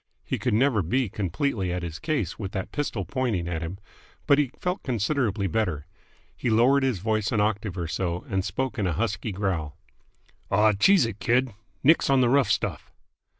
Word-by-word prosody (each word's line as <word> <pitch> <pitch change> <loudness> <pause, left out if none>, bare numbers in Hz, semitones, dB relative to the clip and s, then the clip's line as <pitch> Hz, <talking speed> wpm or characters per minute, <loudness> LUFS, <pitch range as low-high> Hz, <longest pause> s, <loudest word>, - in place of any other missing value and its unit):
He - - -2
could - - 0
never 120 -2 +3
be 120 +7 0
completely 100 - -1
at 90 0 -3
his 85 0 -6
ease 135 - -1
with 100 -3 -5
that 95 -2 -4
pistol 145 -1 -2
pointing 120 -11 -1
at 85 -2 -3
him; 85 +3 -5 0.5
but 140 - +5
he 145 -3 +2
felt 180 +2 -2
considerably 115 -3 0
better. 90 -8 -1 0.5
He 120 - -2
lowered 125 +5 +4
his 130 -5 +1
voice 110 +2 -1
an 110 - +1
octave 105 -2 -1
or 85 -2 -2
so, 85 +2 -2
and 95 -1 -1
spoke 130 +3 -3
in 100 - +1
a 90 - 0
husky 105 +3 -2
growl. 90 -6 -2 0.7
"Aw, 105 +2 +4
cheese 175 - +5
it, 110 -3 -5
kid. 120 +5 +1 0.3
Nix 155 +2 +4
on 135 -1 +4
the 125 -2 +4
rough 140 0 +3
stuff!" - - -1
105 Hz, 190 wpm, -26 LUFS, 95-130 Hz, 0.7 s, but